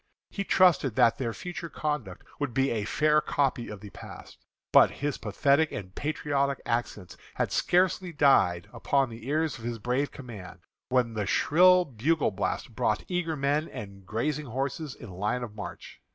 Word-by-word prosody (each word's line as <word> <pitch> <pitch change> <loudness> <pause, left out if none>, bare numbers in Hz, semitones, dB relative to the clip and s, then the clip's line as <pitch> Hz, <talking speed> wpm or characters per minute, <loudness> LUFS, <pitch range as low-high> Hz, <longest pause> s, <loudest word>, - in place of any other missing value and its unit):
He 200 - -3
trusted 175 - +4
that 115 - +4
their 120 -3 -1
future 170 - -6
conduct 150 -13 -4 0.2
would 145 -5 -3
be 135 0 +2
a 110 -3 -1
fair 150 +6 +3
copy 135 -6 0
of 105 -2 -8
the 105 -2 -10
past. - - -11 0.3
But - - +8
his 145 -1 -3
pathetic 140 +8 +2
and 95 -2 -7
patriotic 140 -1 -1
accents 115 -5 -3 0.2
had - - -1
scarcely 180 0 +2
died 135 - +3
upon 135 -3 +1
the 115 +1 -10
ear 155 +3 +1
of 160 - -3
his 120 0 -4
brave 125 +6 -1
command, 110 -9 -10 0.3
when 125 -3 +1
the 105 -3 -2
shrill 180 - +5
bugle 140 +2 0
blast 95 - -3
brought 105 - 0
eager 175 -3 -1
men 145 +2 0
and 100 -1 -9
grazing 140 +9 -2
horses 135 +4 -3
in 115 - -11
line 105 +7 -2
of 115 -3 -7
march. 105 -1 -9
135 Hz, 165 wpm, -28 LUFS, 110-150 Hz, 0.3 s, But